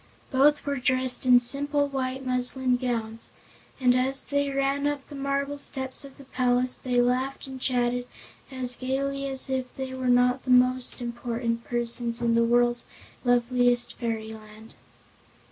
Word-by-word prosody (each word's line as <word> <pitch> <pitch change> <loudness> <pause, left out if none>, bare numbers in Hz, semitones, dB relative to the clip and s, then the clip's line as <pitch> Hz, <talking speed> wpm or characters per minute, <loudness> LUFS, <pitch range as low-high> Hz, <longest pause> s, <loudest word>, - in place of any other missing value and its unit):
Both 290 +2 +3
were 285 -1 -1
dressed 255 0 0
in 250 -1 +8
simple 285 +4 +1
white 265 -1 -3
muslin 255 0 0
gowns, 230 -3 -3 0.5
and 250 -2 +4
as 260 +2 0
they 285 0 0
ran 275 +1 0
up 290 -2 -3
the - - -12
marble 280 +1 -2
steps 265 -1 -2
of 275 -1 -13
the 280 - -12
palace 250 -1 +1
they 250 -1 -1
laughed 255 +3 0
and 265 -1 -9
chatted 245 -1 0 0.4
as 255 -2 -3
gaily 275 +2 -2
as 270 0 -2
if 260 -1 -1
they 265 -1 -5
were 260 -1 -3
not 250 +1 +3
the - - -9
most 250 0 +3
important 235 -1 -3
persons 235 0 +1
in 235 -1 +1
the 230 0 +4
world's 240 +1 +2 0.4
loveliest 245 -1 +2
fairyland. 220 -2 -6
255 Hz, 150 wpm, -26 LUFS, 245-270 Hz, 0.5 s, in